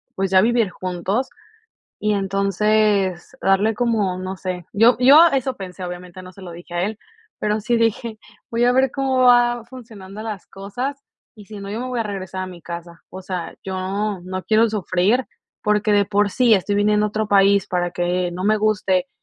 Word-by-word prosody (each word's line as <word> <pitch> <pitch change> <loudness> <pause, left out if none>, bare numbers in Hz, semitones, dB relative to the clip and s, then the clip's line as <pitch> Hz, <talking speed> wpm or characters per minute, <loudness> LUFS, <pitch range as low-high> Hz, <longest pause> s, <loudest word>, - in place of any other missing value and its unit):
pues, 190 0 -2
a 185 - +7
vivir 230 -2 +2
juntos." 185 +9 -3 0.7
Y 210 0 +1
entonces 200 +1 +1
darle 200 +3 +2
como, 210 -6 0
no 185 +1 -5
sé, 180 -2 -5
yo 225 +4 +5
yo 290 +7 +8
eso 265 -1 0
pensé, 185 -1 -8
obviamente 180 +1 -8
no 185 0 -12
se 195 - -15
lo 180 - -8
dije 175 +1 -12
a 175 - 0
él, 215 +1 -4 0.4
pero 210 0 -1
sí 235 +3 0
dije: 230 0 -1 0.3
"Voy 235 +1 +1
a 245 - +4
ver 260 0 +3
cómo 270 -2 -1
va 240 -1 +4
funcionando 215 -5 -10
las 215 -4 -6
cosas, 250 +9 -6 0.3
y 210 - -13
si 210 -2 -9
no, 200 0 -7
yo 220 +3 -4
me 255 - -4
voy 245 -2 -2
a - - +2
regresar 190 -2 -5
a - - -4
mi 180 -2 -11
casa." 170 0 -9
O 190 - -8
sea, 180 -2 -5
yo 190 -1 -4 0.5
no 185 +1 -5
quiero 220 +1 +3
sufrir 205 +4 +1 0.4
porque 210 0 +1
de 200 -1 +3
por 205 0 +1
sí 240 0 +4
estoy 200 +1 0
viniendo 210 0 +2
a - - -2
otro 215 0 -2
país 200 -1 +4
para 175 -1 -1
que 175 0 -1
no 185 +1 -5
me 215 +1 +3
guste, 205 -4 +1
205 Hz, 195 wpm, -21 LUFS, 185-225 Hz, 0.7 s, yo